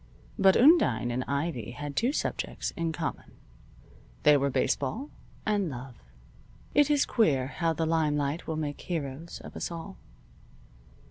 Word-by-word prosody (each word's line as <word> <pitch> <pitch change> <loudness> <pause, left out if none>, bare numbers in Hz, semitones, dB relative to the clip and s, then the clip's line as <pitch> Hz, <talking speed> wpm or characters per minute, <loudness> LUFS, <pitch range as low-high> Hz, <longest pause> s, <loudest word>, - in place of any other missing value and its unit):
But 195 -1 +6
Undine 230 - +5
and 125 +2 -1
Ivy 140 -5 -2
had 145 -1 -5
two 240 - +2
subjects - - -2
in 165 -1 -2
common. 160 -1 -5 0.9
They 150 0 +7
were 140 0 +2
baseball 145 - -1 0.3
and 205 -4 +1
love. 125 - -8 0.7
It 290 0 +4
is 290 -1 +3
queer 145 - +2
how 165 +4 -1
the 160 +1 -1
limelight 150 -1 0
will 160 - -2
make 145 -2 -3
heroes 160 -1 -5
of - - -11
us - - -3
all. 170 +3 -7
160 Hz, 140 wpm, -28 LUFS, 140-185 Hz, 0.9 s, They